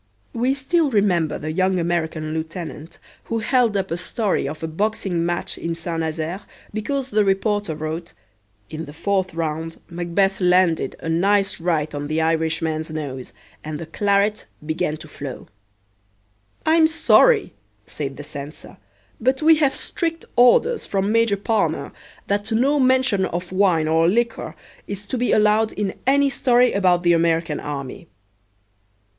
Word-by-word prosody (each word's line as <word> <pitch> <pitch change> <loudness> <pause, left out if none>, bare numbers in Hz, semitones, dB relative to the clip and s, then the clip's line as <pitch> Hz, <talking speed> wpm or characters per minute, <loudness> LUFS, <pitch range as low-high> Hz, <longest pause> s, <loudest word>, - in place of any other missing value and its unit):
We 250 +4 +1
still 300 +3 +1
remember 190 - +1
the 155 +1 -4
young 185 +2 +1
American 160 -2 -2
lieutenant 160 0 -6 0.3
who 230 - -2
held 235 -2 +2
up 190 -2 -3
a 165 - -1
story 200 +3 -1
of 155 +1 -7
a - - -1
boxing 190 0 -1
match 175 0 -3
in 165 0 -3
Saint 165 0 -3
Nazaire 160 +3 -3 0.3
because 265 +5 -2
the 210 0 +3
reporter 200 -2 0
wrote, 160 +3 -5 0.6
"In 160 +1 -5
the 145 - -11
fourth 190 +1 -1
round 165 0 -3
MacBeth 175 +3 0
landed 180 -5 +3
a - - -6
nice 195 +4 +2
right 160 -3 -1
on 145 0 -4
the 155 +2 -1
Irishman's 160 0 0
nose 140 -5 -6 0.3
and 155 0 -5
the 165 - -6
claret 200 +4 0 0.2
began 155 0 -1
to 155 0 -11
flow." 140 -3 -8 1.2
"I'm 320 0 +5
sorry," 430 +8 +4 0.3
said 135 -2 -5
the 145 - -7
censor, 145 +1 -9 0.4
"but 260 +5 +1
we 320 0 +6
have 285 -3 +2
strict 335 -4 -3
orders 340 - +4
from 195 +1 0
Major 230 -2 +3
Palmer 220 +3 -1 0.3
that 205 +2 -1
no 270 +6 +2
mention 255 -7 +3
of 175 0 -4
wine 185 -5 +2
or 165 +1 +3
liquor 230 +4 -1 0.3
is 200 0 -6
to 255 - -3
be 245 - +1
allowed 215 +1 +3
in 200 -2 -2
any 280 +1 +4
story 250 -2 +3
about 180 -3 +2
the 175 0 +4
American 165 -1 +1
army." 140 -3 -6
185 Hz, 150 wpm, -22 LUFS, 160-220 Hz, 1.2 s, we